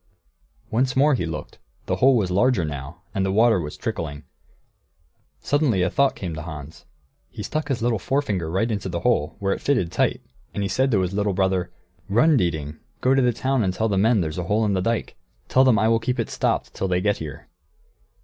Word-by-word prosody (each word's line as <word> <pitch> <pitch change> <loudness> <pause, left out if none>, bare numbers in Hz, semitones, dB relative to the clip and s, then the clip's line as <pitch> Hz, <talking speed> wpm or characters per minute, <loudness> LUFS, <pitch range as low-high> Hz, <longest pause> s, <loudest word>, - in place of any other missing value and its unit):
Once 125 +3 +1
more 145 +3 +4
he 85 -10 -1
looked; 80 -2 -7 0.3
the - - -1
hole 130 -1 +5
was 95 -5 0
larger, 100 -1 +2
now, 75 +3 -7
and 95 - 0
the 95 - 0
water 110 -1 +4
was 75 -1 -6
trickling. 80 -11 -4 1.2
Suddenly 140 -10 +1
a 90 - 0
thought 140 -1 +2
came 90 -4 -5
to 80 - -5
Hans. 75 -1 -9 0.4
He 105 - -7
stuck 155 +6 -3
his 125 -5 -2
little 120 -3 +1
forefinger 100 - -1
right 100 +7 0
into 100 -3 -3
the 85 -1 -3
hole, 95 -10 +1
where 100 0 0
it - - -6
fitted 125 -12 +1
tight; - - 0 0.3
and 100 - -1
he 100 - -1
said 130 +1 +1
to 105 -6 +2
his 90 +1 -2
little 100 0 0
brother, 95 -1 0 0.4
"Run, 135 +10 +4
Dieting! 80 - -1 0.2
Go 130 - +3
to 135 - +3
the 125 -1 +3
town 130 +1 0
and 95 -2 -1
tell 110 0 0
the 100 - 0
men 110 +2 +3
there's 80 +1 -3
a 90 - -3
hole 105 +5 +1
in 105 - +1
the 95 - 0
dike. 115 +4 -2 0.3
Tell 130 - +4
them 130 -5 +4
I 110 - +3
will 115 0 +3
keep 125 +2 -2
it 115 - -2
stopped - - -1
till 95 - -2
they 90 -1 +1
get 105 +2 +1
here." 75 -4 -8
100 Hz, 220 wpm, -23 LUFS, 90-125 Hz, 1.2 s, hole